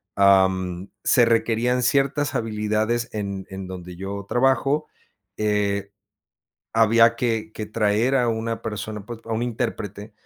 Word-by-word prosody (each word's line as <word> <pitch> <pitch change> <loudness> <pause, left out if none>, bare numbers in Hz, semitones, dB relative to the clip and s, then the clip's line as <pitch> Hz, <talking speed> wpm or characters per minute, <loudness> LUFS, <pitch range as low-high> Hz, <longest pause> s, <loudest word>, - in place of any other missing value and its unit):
mm, 95 -2 +3 0.2
se 120 - +5
requerían 115 +2 +1
ciertas 140 +1 +1
habilidades 110 +1 -1
en 100 -2 -4
en 95 -1 -7
donde 90 -1 -8
yo 100 +2 -6
trabajo, 135 +5 +2 0.5
eh, 100 -2 0 0.8
había 115 +1 +5
que 115 -2 -1
que 110 - -5
traer 110 +4 +1
a 125 -2 +2
una 115 0 -2
persona, 105 -1 -5
pues, 120 -1 -7
a 115 - -5
un 110 +1 -1
intérprete, 105 -3 -4
110 Hz, 130 wpm, -23 LUFS, 100-120 Hz, 0.8 s, se